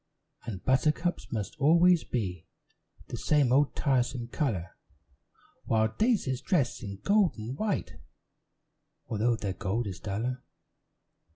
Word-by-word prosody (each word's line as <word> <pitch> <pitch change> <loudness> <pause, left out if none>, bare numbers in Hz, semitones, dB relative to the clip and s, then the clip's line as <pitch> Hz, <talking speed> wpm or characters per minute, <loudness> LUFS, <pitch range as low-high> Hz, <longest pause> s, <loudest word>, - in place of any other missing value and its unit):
And 95 -5 -6
buttercups 155 +6 +1
must 105 -4 -3
always 170 +4 +5
be 90 -7 -3 0.6
The - - -4
same 145 -5 +2
old 140 +2 +3
tiresome 125 -3 0
color; 110 - -2 0.9
While 110 0 +1
daisies 200 - +1
dress 135 -6 0
in 100 -3 -7
gold 205 -2 +3
and 115 +4 -5
white, 150 - -2 1.1
Although 115 +2 +1
their 100 -4 -3
gold 100 +5 -2
is 95 -2 -5
duller. 120 +5 -3
120 Hz, 115 wpm, -29 LUFS, 105-150 Hz, 1.1 s, always